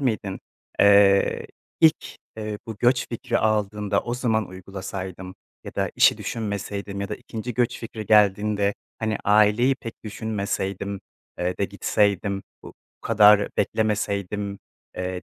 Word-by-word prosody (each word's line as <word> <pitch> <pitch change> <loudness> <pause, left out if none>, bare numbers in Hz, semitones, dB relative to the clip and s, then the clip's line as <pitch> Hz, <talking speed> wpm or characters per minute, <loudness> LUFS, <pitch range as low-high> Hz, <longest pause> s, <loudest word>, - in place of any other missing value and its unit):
miydin? 110 -7 -2 0.4
Eee, 100 -1 +5 0.3
ilk, 160 0 +3 0.2
eee, 105 -1 -4
bu 110 -2 -6
göç 125 +1 +2
fikri 115 - -2
aldığında 105 -1 0
o 120 - -3
zaman 110 -5 0
uygulasaydım 95 0 -7 0.3
ya - - -9
da - - -1
işi - - +5
düşünmeseydim 100 -2 -4
ya 100 - -3
da 105 - -3
2. 115 +2 -7
göç 120 -1 0
fikri 110 -2 -7
geldiğinde, 105 -1 +3 0.2
hani, 110 -1 -1
aileyi 105 +5 +4
pek 115 -2 -10
düşünmeseydim, 100 -3 -3 0.4
eee, 90 +1 -2
de 100 - +1
gitseydim, 100 0 0 0.2
bu - - -11 0.3
kadar 105 -2 +5
beklemeseydim, 100 -2 -1 0.4
eee, 90 0 -4
105 Hz, 125 wpm, -24 LUFS, 100-110 Hz, 0.4 s, Eee